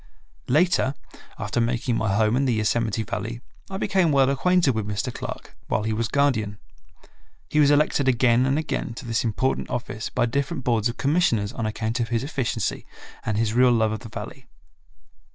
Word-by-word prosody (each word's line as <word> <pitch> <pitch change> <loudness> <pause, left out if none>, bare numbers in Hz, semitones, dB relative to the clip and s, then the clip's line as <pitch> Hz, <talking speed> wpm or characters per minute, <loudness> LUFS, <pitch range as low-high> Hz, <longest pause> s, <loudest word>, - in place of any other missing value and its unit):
Later, 150 -2 +2 0.4
after 120 - -1
making 120 +1 0
my 110 -3 0
home 110 +1 +3
in 135 +2 +2
the 125 -3 +1
Yosemite 110 0 0
Valley, 115 +1 -4 0.3
I 190 - -4
became 190 -4 +2
well 135 -1 +4
acquainted 175 0 +3
with 110 -2 -3
Mr. 105 +4 -2
Clark, - - -7
while 105 - 0
he 110 0 -1
was 115 +1 -1
guardian. 110 -6 +1 0.9
He 150 - +2
was 145 -1 +6
elected 145 -1 +3
again 125 0 +3
and 135 +2 +2
again 150 -6 -3
to 130 - -8
this 115 0 0
important 120 +4 -1
office 115 -2 -4
by 125 - +1
different 135 +4 -2
Boards 115 -2 +1
of 115 - -6
Commissioners 130 -9 +1
on 115 -4 -2
account 110 +2 -2
of 115 - 0
his 115 0 0
efficiency 135 -4 -2 0.4
and 110 -1 0
his 110 -1 +1
real 125 +1 +5
love 110 -2 +2
of 110 - -3
the 115 - -10
Valley. - - -8
120 Hz, 185 wpm, -24 LUFS, 110-135 Hz, 0.9 s, was